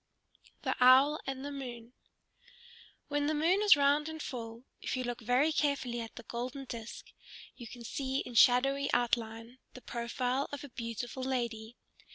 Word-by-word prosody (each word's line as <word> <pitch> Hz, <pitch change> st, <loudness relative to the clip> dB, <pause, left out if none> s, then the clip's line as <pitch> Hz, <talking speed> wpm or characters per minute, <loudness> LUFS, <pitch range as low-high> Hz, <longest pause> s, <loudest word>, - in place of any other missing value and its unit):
THE -, -, 0 dB
OWL 270 Hz, +4 st, +7 dB
AND 270 Hz, 0 st, -4 dB
THE 285 Hz, -, -4 dB
MOON 245 Hz, -4 st, -7 dB, 1.1 s
When 290 Hz, 0 st, 0 dB
the 310 Hz, -, +1 dB
moon 340 Hz, +7 st, +2 dB
is 420 Hz, -4 st, +8 dB
round 290 Hz, +2 st, +2 dB
and 315 Hz, 0 st, -7 dB
full, 230 Hz, -4 st, -6 dB, 0.2 s
if -, -, -2 dB
you 255 Hz, -, -1 dB
look 245 Hz, -1 st, -4 dB
very 250 Hz, +7 st, +2 dB
carefully 275 Hz, -6 st, 0 dB
at 225 Hz, -1 st, -8 dB
the -, -, -9 dB
golden 255 Hz, +3 st, -5 dB
disk 235 Hz, -2 st, -8 dB, 0.4 s
you 240 Hz, -, -9 dB
can 240 Hz, +1 st, -10 dB
see 265 Hz, +3 st, -2 dB
in 245 Hz, -, -8 dB
shadowy 270 Hz, +4 st, +4 dB
outline 235 Hz, 0 st, -1 dB, 0.2 s
the 255 Hz, -, -10 dB
profile 245 Hz, +3 st, -2 dB
of 285 Hz, -1 st, -6 dB
a 285 Hz, -, -9 dB
beautiful 235 Hz, +2 st, -5 dB
lady. 240 Hz, -3 st, -3 dB
255 Hz, 165 wpm, -32 LUFS, 235-280 Hz, 1.1 s, is